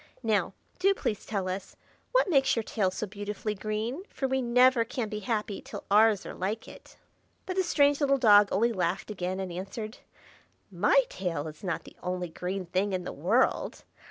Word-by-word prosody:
Now, 205 -4 +1 0.2
do 390 +2 +4
please 210 - -3
tell 195 -3 -2
us 185 +1 -5 0.4
what - - +3
makes 275 -6 +3
your 230 - -1
tail 205 -3 0
so 190 +3 -4
beautifully 210 +1 -4
green, 215 - -3
for 270 - -2
we 265 0 0
never 250 0 +5
can 230 -1 -4
be 210 - -4
happy 210 -1 -2
till - - -8
ours 215 -1 +5
are - - -6
like 210 +5 -3
it." - - -14 0.5
But 370 - -4
the 380 - +3
strange 285 -4 +3
little 275 -1 +3
dog 210 -5 +6
only 230 +4 +2
laughed 185 +2 -1
again 185 -1 -3
and 190 -2 -4
answered, 205 +5 -6 0.7
"My 205 +9 +4
tail 170 -5 -3
is 155 +3 -10
not 180 -4 -2
the - - -14
only 180 -1 -3
green 185 +3 -4
thing 190 +3 0
in 185 -1 -1
the - - -5
world. - - +1
210 Hz, 185 wpm, -29 LUFS, 185-240 Hz, 0.7 s, dog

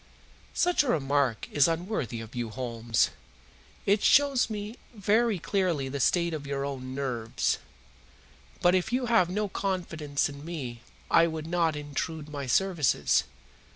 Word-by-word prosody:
"Such 355 0 +3
a 290 - -2
remark 140 - +1
is 145 -2 +5
unworthy 165 - -2
of 110 0 -10
you, 120 -2 -3
Holmes. 115 -2 0 0.7
It 200 +1 +3
shows 275 -4 +4
me 210 +2 -5 0.2
very 215 +1 +2
clearly 175 -7 0
the 140 +1 -4
state 170 +5 +2
of 145 -3 -5
your 140 0 -2
own 130 -2 -5
nerves. 125 -4 -1 1.0
But 175 - +6
if 185 +4 +1
you 250 +1 +1
have 225 -7 +3
no 205 +3 -1
confidence 170 -7 -1
in 140 0 -9
me 135 -8 -6 0.3
I 165 - +6
would 160 -1 -4
not 165 -2 +1
intrude 150 +1 -4
my 140 -2 -5
services. 170 +1 +2
160 Hz, 145 wpm, -28 LUFS, 135-195 Hz, 1.0 s, But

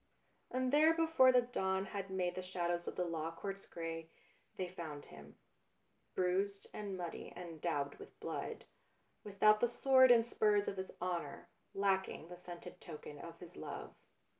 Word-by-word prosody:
And 255 +1 0
there, 310 +2 +6
before 320 -6 +6
the 250 -1 +5
dawn 190 -5 0
had 195 -2 -5
made 185 -2 0
the 185 - -4
shadows 175 -1 -2
of - - -3
the 180 - 0
Law 165 -1 -2
Courts 195 +4 -6
grey, 165 -1 -5 0.5
they 185 - -1
found 160 -5 -7
him; 75 -1 -13 0.8
bruised 195 +2 +1
and 200 -3 -4
muddy 175 -2 -5
and 170 -3 -8
daubed 145 -4 -1
with - - -12
blood, - - -4 0.6
without 210 +1 +5
the 240 - +4
sword 260 +2 +6
and 235 -2 +7
spurs 210 -3 +3
of 195 - -2
his 190 0 -3
honour, 175 -5 -3 0.3
lacking 190 -4 0
the 180 - -8
scented 175 -1 -9
token 150 -2 -8
of 165 +1 -8
his 175 0 -11
love. - - -6
185 Hz, 165 wpm, -37 LUFS, 170-210 Hz, 0.8 s, and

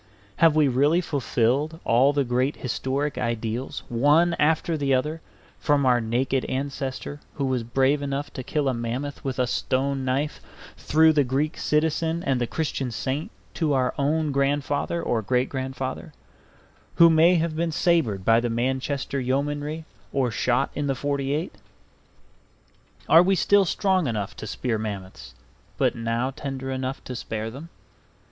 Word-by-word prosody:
Have 165 -2 +5
we 155 -2 +4
really 140 +6 +3
fulfilled 145 0 0
all 125 +5 +4
the 145 -1 +1
great 130 +3 0
historic 135 +3 -2
ideals 115 +1 -3
one 150 +8 +3
after 160 +3 +2
the 140 -3 +1
other, 150 +5 -2 0.4
from 145 -2 +2
our 125 -2 +4
naked 130 +4 0
ancestor 135 +1 -4 0.2
who 140 - -1
was 130 -2 0
brave 135 +5 +1
enough 140 +1 -3
to - - -5
kill 145 +2 -1
a 130 - +2
mammoth 120 +5 -4
with 135 -2 -3
a 125 - +2
stone 135 +2 -1
knife, 135 +3 -1 0.4
through 160 +1 +4
the 145 -2 +3
Greek 135 +5 -1
citizen 160 +2 0
and 130 -2 0
the 120 - 0
Christian 140 -1 -2
saint 135 - -3 0.2
to 155 -4 0
our 130 -2 +1
own 150 +2 +1
grandfather 145 +4 0
or 115 - 0
great 125 +4 0
grandfather, 130 -1 -5 0.8
who 170 - +8
may 165 +2 +5
have 165 -1 0
been 165 +1 -1
sabred 155 - +1
by 115 0 +5
the 120 0 -1
Manchester 130 +4 -1
Yeomanry 145 +4 -2 0.3
or 130 -3 0
shot 125 +6 +1
in 145 -1 -2
the 135 - 0
'48? 140 +4 -2 1.5
Are 165 - +8
we 190 +2 +3
still 200 +2 +4
strong 185 -2 +1
enough 105 -5 -3
to 110 - -7
spear 115 +1 -2
mammoths, 100 -3 -7 0.4
but - - +2
now 115 +3 -1
tender 135 -1 -5
enough 130 0 -4
to 125 - -6
spare 110 -1 -4
them? 145 +7 -10
135 Hz, 155 wpm, -25 LUFS, 125-150 Hz, 1.5 s, who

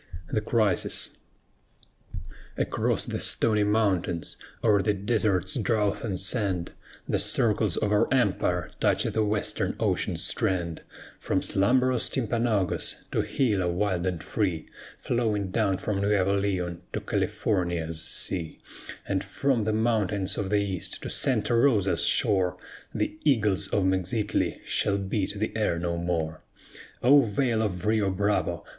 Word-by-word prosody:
THE 110 - +1
CRISIS 105 -4 +2 1.5
Across - - 0
the - - -4
Stony 105 -2 +3
Mountains, 100 -5 0 0.3
o'er 105 -3 +4
the 105 0 +1
desert's 100 +2 0
drouth 105 -5 0
and 100 -5 -3
sand, 95 -4 -1 0.4
The - - 0
circles - - +2
of 105 - 0
our 105 - +2
empire - - +1
touch - - +2
the 110 - 0
western 105 0 -1
ocean's - - -1
strand; 85 -4 -1 0.4
From - - -1
slumberous 125 +5 +2
Timpanogos 115 -6 0
to - - +1
Gila, 105 -9 0
wild 90 0 -1
and 90 -3 -3
free, 90 -7 -2 0.3
Flowing 105 -5 -1
down 100 -3 +1
from 100 0 -2
Nuevo 100 -1 +2
Leon 90 -4 -2
to - - -1
California's 85 -5 -1
sea; 85 -2 0 0.5
And 95 -1 -1
from 130 -6 0
the 110 - +1
mountains 105 -4 0
of 95 - -3
the 105 - +2
east, 100 -3 -3
to - - -4
Santa - - +2
Rosa's 115 -6 +3
shore, 90 -3 +2 0.3
The 155 - -3
eagles 105 -10 +2
of 100 - 0
Mexitli 95 +3 -1
shall 100 -1 +1
beat 100 +1 -2
the 110 +2 -3
air 105 -6 0
no 85 0 -2
more. 85 -2 -2 0.6
O 140 +4 +7
Vale 115 0 0
of 90 -4 -2
Rio 105 -2 +2
Bravo! 100 +2 -1
100 Hz, 135 wpm, -26 LUFS, 95-110 Hz, 1.5 s, O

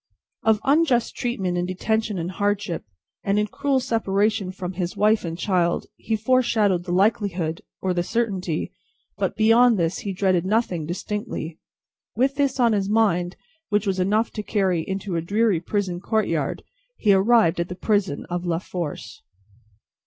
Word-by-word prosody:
Of 220 -1 +3
unjust 275 -4 +2
treatment 190 -7 -1
in 175 - -1
detention 215 +3 -1
and 170 +1 -3
hardship, 205 -2 -1 0.4
and 200 +1 +1
in 210 - +2
cruel 280 +4 0
separation 210 -4 0
from 185 -1 -5
his 180 -1 -3
wife 215 +1 +3
and 165 -1 -4
child, 180 -3 +1
he 220 - -2
foreshadowed 220 -6 +2
the 180 - -4
likelihood, 185 -4 +1 0.2
or 185 -1 +1
the 175 - 0
certainty; 190 -5 -2 0.5
but, - - -1
beyond 225 +1 +5
this, 165 -1 0
he 200 - -4
dreaded 185 -2 +1
nothing 185 -6 0
distinctly. 175 -3 -4 0.6
With 260 +4 +2
this 275 -2 0
on 235 -2 +4
his 200 -1 0
mind, 190 -5 +2 0.3
which 205 0 +1
was 190 -2 0
enough 210 +5 +1
to 215 - -4
carry 190 -5 0
into 190 +1 -4
a - - 0
dreary 205 +1 +1
prison 185 0 -2
courtyard, 185 - -1 0.3
he 205 -3 +4
arrived 195 -3 +4
at 170 - -1
the 180 - -5
prison 200 -7 0
of 175 0 -3
La 170 -2 0
Force. 165 -10 -6
195 Hz, 160 wpm, -23 LUFS, 180-220 Hz, 0.6 s, beyond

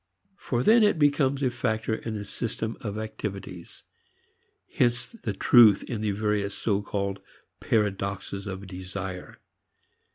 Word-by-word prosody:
For 120 -1 -1
then 230 - +6
it 205 -5 +4
becomes 145 -2 +2
a 130 - +2
factor 115 -2 -1
in 110 0 -4
the 105 -1 -5
system 110 +1 -4
of 105 -2 -4
activities. 100 -5 -7 0.8
Hence 120 0 +1
the 215 - -5
truth 110 0 +6
in 115 -4 -4
the 110 - 0
various 105 -1 -1
so 105 -2 0
called 100 -1 -3 0.4
paradoxes 100 -1 -1
of 95 0 -6
desire. 95 0 -7
105 Hz, 130 wpm, -27 LUFS, 100-120 Hz, 0.8 s, then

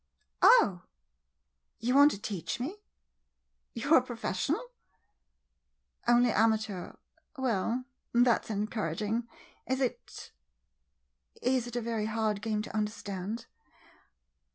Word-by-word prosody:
] - - -50 0.2
Oh, 180 -3 -2 1.0
you 245 +3 0
want 285 +2 +8
to 205 - -5
teach 210 +2 -4
me! 305 +12 -4 1.0
You 280 +7 +1
're - - +10
a - - +5
pro 245 -1 -7
fessional? 230 - -1 1.4
Only 240 0 +5
amateur 220 -3 +1 0.2
— - - -33
well 245 0 0
— - - -52
that 240 -1 +3
's - - -13
en 210 -1 -1
couraging. 215 +2 -2 0.4
Is 260 +1 0
it 255 -3 -4 0.5
— 65 -1 -32
is 245 -2 -1
it 240 - -8
a 240 - 0
very 225 -2 -2
hard 215 -2 -1
game 215 -1 -1
to 220 - -8
understand? 210 0 -3
225 Hz, 130 wpm, -30 LUFS, 205-245 Hz, 1.4 s, re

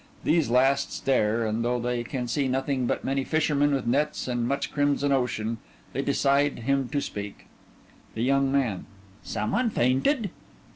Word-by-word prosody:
These 160 -6 +2
last 135 +3 +3
stare, 115 -3 +1
and 110 +1 -1
though 120 +1 0
they 120 0 -1
can 125 0 -4
see 135 +3 0
nothing 130 -1 0
but - - -1
many 135 0 0
fishermen 145 -1 +1
with 135 -3 0
nets 145 +6 0
and 120 -1 -1
much 140 +2 -2
crimson 145 -1 +1
ocean, 115 -4 0 0.3
they 135 - -1
decide 140 +1 +2
him 135 +2 0
to - - -2
speak_) 105 -7 -5 0.7
THE 110 - -1
YOUNG 135 +1 +2
MAN: 125 -9 0 0.4
Some 105 - -3
one 250 -1 +1
fainted? 195 - +1
135 Hz, 160 wpm, -26 LUFS, 120-140 Hz, 0.7 s, last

